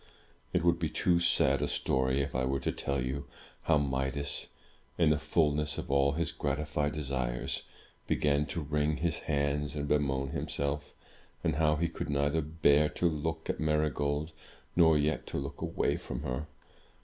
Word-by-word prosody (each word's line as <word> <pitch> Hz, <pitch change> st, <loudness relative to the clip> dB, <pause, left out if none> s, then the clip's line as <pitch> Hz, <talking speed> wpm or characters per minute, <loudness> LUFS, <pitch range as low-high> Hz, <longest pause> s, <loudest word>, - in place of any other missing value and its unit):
It -, -, +1 dB
would 85 Hz, -1 st, +3 dB
be 80 Hz, -2 st, 0 dB
too 85 Hz, +2 st, +2 dB
sad 85 Hz, -, +4 dB
a -, -, +1 dB
story, 65 Hz, +1 st, +1 dB
if 70 Hz, -1 st, -3 dB
I 65 Hz, -, 0 dB
were 65 Hz, +1 st, 0 dB
to -, -, 0 dB
tell 70 Hz, 0 st, -2 dB
you 70 Hz, +2 st, -4 dB, 0.3 s
how 80 Hz, -, +3 dB
Midas, 70 Hz, 0 st, -2 dB, 0.5 s
in 80 Hz, -3 st, +4 dB
the 75 Hz, -, +2 dB
fulness 75 Hz, -1 st, +1 dB
of -, -, -4 dB
all 70 Hz, 0 st, +3 dB
his 85 Hz, 0 st, -1 dB
gratified 75 Hz, +1 st, -1 dB
desires, 65 Hz, -5 st, -2 dB, 0.5 s
began 75 Hz, 0 st, +2 dB
to 85 Hz, -, -3 dB
wring 75 Hz, +1 st, 0 dB
his 85 Hz, -1 st, -1 dB
hands 70 Hz, 0 st, -1 dB
and 75 Hz, -1 st, -2 dB
bemoan 70 Hz, -2 st, +1 dB
himself; 70 Hz, +1 st, -3 dB, 0.5 s
and 75 Hz, -2 st, +1 dB
how 75 Hz, -1 st, +3 dB
he 85 Hz, +2 st, +1 dB
could 85 Hz, -, -5 dB
neither 70 Hz, +2 st, +1 dB
bear 75 Hz, -1 st, +3 dB
to 90 Hz, -, +1 dB
look 80 Hz, +1 st, -2 dB
at -, -, -2 dB
Marygold, 75 Hz, 0 st, 0 dB, 0.4 s
nor 80 Hz, -3 st, +6 dB
yet 75 Hz, +1 st, 0 dB
to -, -, -4 dB
look 70 Hz, 0 st, -5 dB
away -, -, 0 dB
from -, -, -6 dB
her. 65 Hz, +5 st, -3 dB
75 Hz, 170 wpm, -31 LUFS, 70-75 Hz, 0.5 s, nor